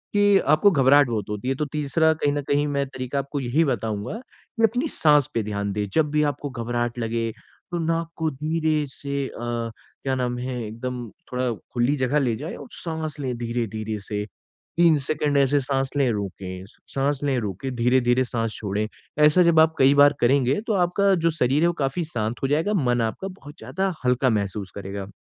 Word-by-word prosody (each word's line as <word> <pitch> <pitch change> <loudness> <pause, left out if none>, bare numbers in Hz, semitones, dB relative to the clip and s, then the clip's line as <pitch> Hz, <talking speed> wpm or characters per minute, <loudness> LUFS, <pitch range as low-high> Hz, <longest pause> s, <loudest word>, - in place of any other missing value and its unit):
कि 205 -1 +5
आपको 155 +7 +5
घबराहट 140 -2 +5
बहुत 105 -4 -3
होती 105 +4 -3
है। - - +2
तो 150 - -1
तीसरा 155 +2 +2
कहीं 145 -2 0
न 145 - -1
कहीं 145 +1 +2
मैं 140 -1 0
तरीका 130 +1 -4
आपको 140 +1 -3
यही 135 +5 +1
बताऊँगा 110 - -2
कि 230 -1 -8
अपनी 245 +7 +2
साँस 150 - +4
पे 115 - +1
ध्यान 100 -1 -3
दें। 105 0 -2
जब 155 -2 +2
भी 150 0 +2
आपको 145 +1 -7
घबराहट 120 -1 -3
लगे 115 0 -1 0.4
तो 175 - -1
नाक 165 0 0
को 160 -1 0
धीरे 155 +1 0
से 140 0 -3
अ, - - -10 0.7
क्या 135 -1 0
नाम 125 -1 -1
है? 125 -1 -3
एकदम 120 +2 -5 0.2
थोड़ा 125 -1 0 0.2
खुली 120 +4 +2
जगह 130 +3 +1
ले 125 -5 +1
जाएँ 155 +8 -6
और - - -10
साँस 160 -3 -5
लें 130 -3 -2
धीरे-धीरे 110 -2 -3
से 105 +1 -4 0.5
3 170 -2 +5
सेकंड 150 -1 +1
ऐसे 140 +1 +4
साँस 135 0 -1
लें 135 -3 +3
रोकें, 95 -3 -5 0.3
साँस 140 +1 +1
लें 140 -2 +1
रोके, 105 +4 -4
धीरे-धीरे 125 +1 +2
साँस 115 -2 -2
छोड़ें। 105 +1 -2 0.4
ऐसा 150 +4 +6
जब 170 -2 +4
आप 160 0 +5
कई 135 +1 +6
बार 145 0 +7
करेंगे 130 +3 +3
तो 220 - +1
आपका 195 +3 +2
जो - - +3
शरीर 135 +4 +3
है - - +5
वो 175 - +1
काफ़ी 135 +6 -1
शांत 110 +1 -2
हो - - +3
जाएगा। 160 +9 +1
मन 125 - +1
आपका 115 +12 -2
बहुत 155 -6 -11
ज़्यादा 190 0 -2
हल्का 125 +1 +3
महसूस 100 -3 -2
करेगा। 100 0 -6
135 Hz, 195 wpm, -24 LUFS, 120-150 Hz, 0.7 s, बार